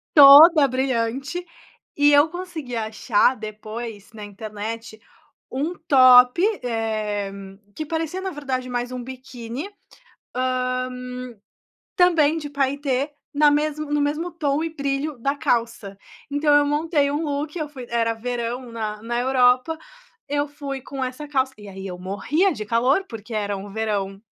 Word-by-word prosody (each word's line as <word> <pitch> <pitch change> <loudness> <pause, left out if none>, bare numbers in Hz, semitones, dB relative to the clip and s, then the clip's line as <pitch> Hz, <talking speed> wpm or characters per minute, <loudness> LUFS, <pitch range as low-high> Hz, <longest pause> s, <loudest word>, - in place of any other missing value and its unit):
Toda 295 +2 +10
brilhante, 260 +5 -2 0.5
e 290 0 +5
eu 290 +2 +6
consegui 345 -7 -7
achar 220 +2 +1
depois 215 0 -8
na 215 -1 -9
internet, 215 +2 -7 0.5
um 290 +7 -2 0.2
top, 255 +2 +7 0.2
eh, 215 -4 -2 0.4
que 310 - -4
parecia 325 +4 -3
na 380 - -3
verdade 265 -5 -4
mais 245 0 -3
um 250 -1 -5
biquíni, 255 - -7 0.7
hã, 255 0 -1 1.1
também 330 -4 +4
de 300 -2 -5
paetê, 280 0 -1 0.2
na 295 0 +5
mesmo 300 0 -1
no 295 - +2
mesmo 305 +5 -1
tom 300 -2 -1
e 330 - -2
brilho 280 0 -2
da 275 +4 0
calça. 230 -6 -1 0.3
Então 290 +1 +2
eu 290 0 +5
montei 295 -1 +1
um 295 +3 -1
look, 290 +1 -3
eu 310 -2 -3
fui 265 -4 -9
era 230 -1 +1
verão 240 +1 -4
na 215 -2 -4
na 240 +1 -2
Europa, 255 +4 +3 0.5
eu 290 0 0
fui 280 -2 -6
com 270 +1 -5
essa 255 +4 -5
calça, 265 -2 0
e 205 -1 -12
aí 195 0 -9
eu 180 -1 -7
morria 280 - 0
de 215 - -6
calor, 250 - +2
porque 225 0 -8
era 205 -2 -2
um 200 +1 -9
verão 200 -3 -2
260 Hz, 145 wpm, -23 LUFS, 230-290 Hz, 1.1 s, Toda